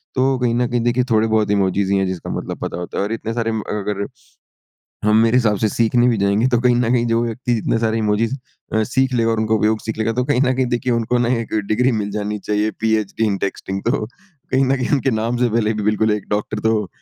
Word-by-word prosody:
तो 130 0 +2
कहीं 120 -2 +1
ना 120 0 +1
कहीं 120 0 -1
देखिए 120 +2 +1
थोड़े 110 0 +3
बहुत 110 -2 +1
इमोजीस 100 -1 +1
ही 100 - +2
हैं 95 - +1
जिसका 95 -2 -5
मतलब - - -4
पता - - -4
होता 90 0 -6
है, - - +1
और 105 - -3
इतने 115 0 -4
सारे 115 -1 -1
म 110 -1 -2
अगर 100 -1 -2 1.0
हम 105 0 +4
मेरे 115 +2 +3
हिसाब 110 -4 +3
से 110 - +1
सीखने 120 +3 +2
भी 115 - +2
जाएँगे, 100 +4 +2
तो 120 -2 +2
कहीं 125 -1 +3
ना 120 -1 +1
कहीं 120 -1 +2
जो 115 0 +1
व्यक्ति 120 +1 -2
जितने 115 0 0
सारे 115 0 0
इमोजीस 110 +3 0 0.4
अ, 110 - +2
सीख 130 +1 0
लेगा 115 -1 +2
और 115 -1 0
उनका 110 0 +1
उपयोग 110 0 +1
सीख 110 0 -5
लेगा 110 +1 0
तो 125 +2 0
कहीं 140 -2 +1
ना 130 -1 +2
कहीं 130 0 +1
देखिए 125 +1 -1
उनको 115 +1 +1
ना 120 -1 +1
एक 115 - -6
डिग्री 125 +4 +2
मिल 100 - -4
जानी 105 0 -3
चाहिए 105 +1 -1
पीएचडी 110 0 0
इन 100 -2 0
टेक्सटिंग। 95 0 -4
तो 110 - 0
कहीं 135 - -3
ना 135 +1 +2
कहीं 125 -2 -2
उनके 135 -2 +2
नाम 115 +2 -1
से 125 0 +2
पहले 110 -1 +1
भी 105 - -3
बिल्कुल 105 +1 +1
एक 105 -2 -4
डॉक्टर 105 +1 -2
तो 110 -3 0
115 Hz, 255 wpm, -19 LUFS, 105-120 Hz, 1.0 s, हम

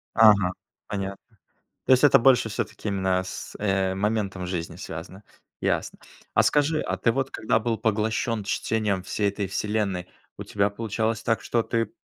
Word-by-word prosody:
Ага, 105 -5 +6 0.3
понятно. 100 -1 -4 0.7
То - - +2
есть 130 +1 +6
это 140 -2 +7
больше 125 -2 +4
всё-таки, 105 - -4
именно, 95 -1 +1
с 95 - -8
э, 95 -2 +1
моментом 100 -2 -1
жизни 85 -2 -4
связано? 90 +3 -8 0.4
Ясно. - - -1 0.4
А - - +6
скажи, 150 +1 +2
а - - -2
ты 115 - +2
вот 135 +2 -2
когда 110 0 +1
был 115 0 -1
поглощен 110 +1 0
чтением 105 -1 -1
всей 100 +2 0
"Этой 100 -1 -3
вселенной", 100 -3 -1 0.3
у - - -6
тебя 100 0 0
получалось 110 +1 -2
так, 115 - +1
что 115 -1 0
ты 115 -2 -1
105 Hz, 160 wpm, -25 LUFS, 95-115 Hz, 0.7 s, это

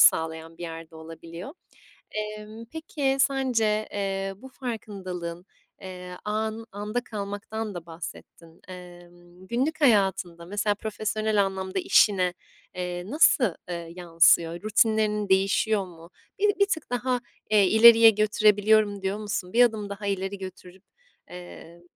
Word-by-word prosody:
sağlayan 160 +1 +3
bir - - -8
yerde 165 -1 -8
olabiliyor. 165 - -9 0.6
Emm, 215 +1 -6
peki, 285 -1 -2
sence, 240 -6 +1
eee, 195 -1 -2
bu 260 +5 -12
farkındalığın, 185 -9 -6 0.4
eee, 180 -1 -8
an 220 +1 -2
anda 210 +4 -3
kalmaktan 210 0 -5
da 170 -1 -7
bahsettin. 165 0 -11
Emm, 175 0 -13
günlük 285 +7 -1
hayatında, 190 -8 +2
mesela, 205 +2 -1
profesyonel 215 -1 -1
anlamda 190 0 -3
işine, 185 -2 +3 0.4
eee, 180 -1 -4
nasıl, 300 -1 +4 0.3
ııı, 170 -1 -5
yansıyor? 170 0 +3
Rutinlerin 215 -1 +1
değişiyor 195 +1 +2
mu? 170 -1 -14 0.3
Bi 410 0 +3
bir 400 - +6
tık 320 -9 -3
daha, 245 0 -1 0.3
eee, 210 -2 +5
ileriye 225 +1 +8
götürebiliyorum, 210 -1 +3
diyor 195 +2 -2
musun? 205 -3 -4
Bir 245 +1 +6
adım 215 -4 0
daha 200 0 -6
ileri 195 0 -2
götürüp, 185 0 -10 0.5
eee, 175 -1 -11
200 Hz, 125 wpm, -26 LUFS, 180-220 Hz, 0.6 s, ileriye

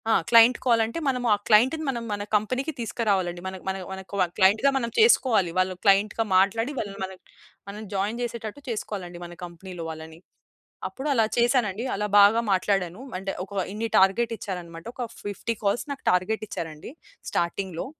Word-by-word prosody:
ఆ! - - +5 0.2
క్లయింట్ 230 +1 +7
కాలంటే 230 +2 +2
మనము, 250 -2 0
ఆ - - +5
క్లయింట్‌‌ని 255 +9 +4
మనం 240 -3 -3
మన 205 0 -2
కంపెనీకి 255 +8 0
తీస్కరావాలండి. 195 -6 -1
మన 190 - -5
మన 190 - 0 0.2
మనకు 190 +1 -7 0.2
క్లయింట్‌గా 205 +8 +5
మనం 235 -3 -1
చేసుకోవాలి. 250 - +4
వాళ్ళు 185 0 +2
క్లయింట్‌గా 205 +2 +3
మాట్లాడి. 225 +7 +2
వాళ్ళని 200 -4 -4
మనం 190 0 -10 0.5
మనం 205 +2 -7
జాయిన్ 205 +4 -1
చేసేటట్టు 235 +1 -5
చేసుకోవాలండి 190 -6 -5
మన 175 - -9
కంపెనీలో 175 0 -9
వాళ్ళని. 160 0 -9 0.7
అప్పుడు 270 +3 -6
అలా 225 -4 +3
చేసానండి. 235 -3 +2
అలా 210 +1 -2
బాగా 205 +3 +6
మాట్లాడాను. 190 +1 0 0.2
అంటే 195 +1 -4
ఒక 195 - -12 0.2
ఇన్ని 220 +2 -2
టార్గెట్ 195 +5 +3
ఇచ్చారన్నమాట. 175 -4 -7
ఒక 250 - -3 0.2
50 205 +3 -3
కాల్స్ 200 +3 +1
నాకు 280 - -7
టార్గెట్ 185 +5 0
ఇచ్చారండి 165 +1 -6 0.4
స్టార్టింగ్‌లో. 170 0 -2
205 Hz, 155 wpm, -25 LUFS, 185-230 Hz, 0.7 s, క్లయింట్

